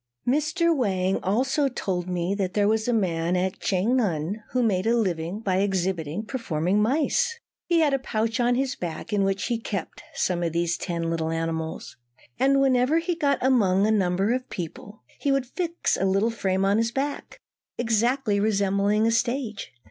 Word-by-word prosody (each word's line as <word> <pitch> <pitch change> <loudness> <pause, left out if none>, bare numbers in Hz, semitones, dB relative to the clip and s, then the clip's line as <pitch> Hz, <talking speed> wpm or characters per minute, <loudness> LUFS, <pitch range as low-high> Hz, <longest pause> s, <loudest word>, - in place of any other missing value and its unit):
Mr. 310 +5 +2
Wang 190 -7 0
also 265 - +1
told 185 -7 -3
me 180 +1 -1
that 195 -2 -2
there 205 -1 +3
was 220 +1 +1
a - - +2
man 175 -6 0
at 185 +1 -1
Ch'ang 215 +7 +1
an 180 +1 -2
who 250 -1 0
made 195 -4 +1
his 230 +1 +3
living 180 -3 -1
by 190 -4 0
exhibiting 190 -2 -1
performing 200 - -1
mice. 320 - +1 0.3
He 340 -1 +3
had 295 -3 +3
a 275 - +2
pouch 225 -1 -2
on 245 0 +3
his 270 +1 -1
back 170 +3 -5
in 200 -1 +2
which 195 0 0
he 235 -2 -1
kept 205 -4 -5
some 180 -2 0
ten 175 - 0
of 165 - -5
these 170 0 0
little 165 -1 -1
animals; 165 -3 -4 0.4
and 275 +1 +4
whenever 265 +2 +3
he 335 +2 0
got 290 -4 +1
among 205 -7 +3
a 215 - +2
number 195 +1 +1
of 255 0 -3
people 185 +4 -7 0.2
he 285 - 0
would 275 -1 +1
fix 340 +6 -1
a 195 - -1
little 195 +4 +2
frame 190 -3 0
on 200 +2 +3
his 230 +1 +1
back, 280 +3 -4 0.4
exactly 235 -1 +1
resembling 200 0 +2
a 230 - +3
stage. 235 -2 -1
210 Hz, 180 wpm, -25 LUFS, 185-255 Hz, 0.4 s, and